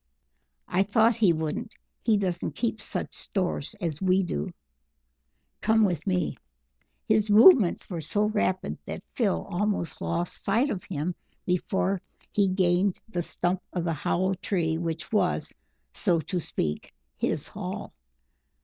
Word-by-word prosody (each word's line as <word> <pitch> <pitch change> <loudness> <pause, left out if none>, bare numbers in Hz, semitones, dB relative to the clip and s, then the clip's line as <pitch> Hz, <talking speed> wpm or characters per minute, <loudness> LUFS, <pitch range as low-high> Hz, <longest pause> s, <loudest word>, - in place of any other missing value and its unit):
"I 180 - +2
thought 220 +4 +4
he 210 -6 +5
wouldn't. 160 +8 -3 0.3
He 220 -2 +3
doesn't 180 -3 -2
keep 225 -3 -1
such - - -3
stores 185 -1 -2
as 165 -5 -3
we 190 0 +3
do. 75 - -3 1.1
Come 220 0 +4
with 180 -1 -2
me." 180 -8 0 0.7
His 215 0 +3
movements 215 - +7
were 170 -4 -4
so 205 +7 +1
rapid 210 -3 0
that - - -5
Phil 210 -6 0
almost 200 -1 -1
lost 170 +1 -2
sight 235 +8 +2
of 185 - -3
him 170 0 -2 0.3
before 190 +1 0 0.3
he 200 -1 +3
gained 185 0 +2
the 175 -5 -1
stump 175 +2 -1
of 175 - -1
the 165 -1 0
hollow 185 +5 0
tree 175 -4 0
which 165 -2 -4
was, 215 - +1 0.4
so 175 -5 +2
to 180 +3 -2
speak, 75 - -3 0.2
his - - -2
hall. - - -6
185 Hz, 140 wpm, -27 LUFS, 175-210 Hz, 1.1 s, movements